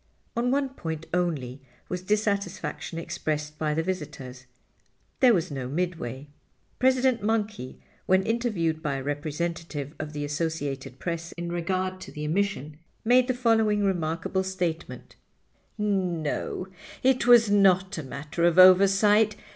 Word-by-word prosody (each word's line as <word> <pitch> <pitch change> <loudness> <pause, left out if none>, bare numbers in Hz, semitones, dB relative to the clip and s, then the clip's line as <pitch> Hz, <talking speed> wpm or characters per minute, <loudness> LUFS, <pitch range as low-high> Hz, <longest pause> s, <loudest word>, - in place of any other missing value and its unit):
On 240 +1 +1
one 275 +1 +1
point 160 - -6
only 145 -8 -1 0.3
was 180 0 -4
dissatisfaction 200 -4 -2
expressed 150 -2 -4
by 150 -1 0
the 160 - 0
visitors—there 140 -8 -6 0.9
was 175 -8 +1
no 135 -3 -4
Midway. 145 -4 -3 0.5
President 255 -1 +3
Monkey, 210 - -2 0.3
when 190 +1 +4
interviewed 205 -9 -1
by 145 -3 -1
a 135 - -4
representative 150 0 -4
of 155 0 -5
the 145 0 -3
Associated 145 -4 -3
Press 170 +1 -4
in 170 0 -5
regard 185 +2 -2
to - - -9
the 150 -1 -5
omission, 155 -4 -2 0.3
made 250 +2 +5
the 255 - 0
following 225 -4 +2
remarkable 175 0 -1
statement: 180 -3 -4 0.6
"No, 185 -5 -1 0.4
it 255 -2 +3
was 235 -3 +7
not 190 -2 +4
a - - -2
matter 150 +4 -5
of 175 0 +3
oversight. 200 +3 +6
175 Hz, 130 wpm, -26 LUFS, 150-205 Hz, 0.9 s, was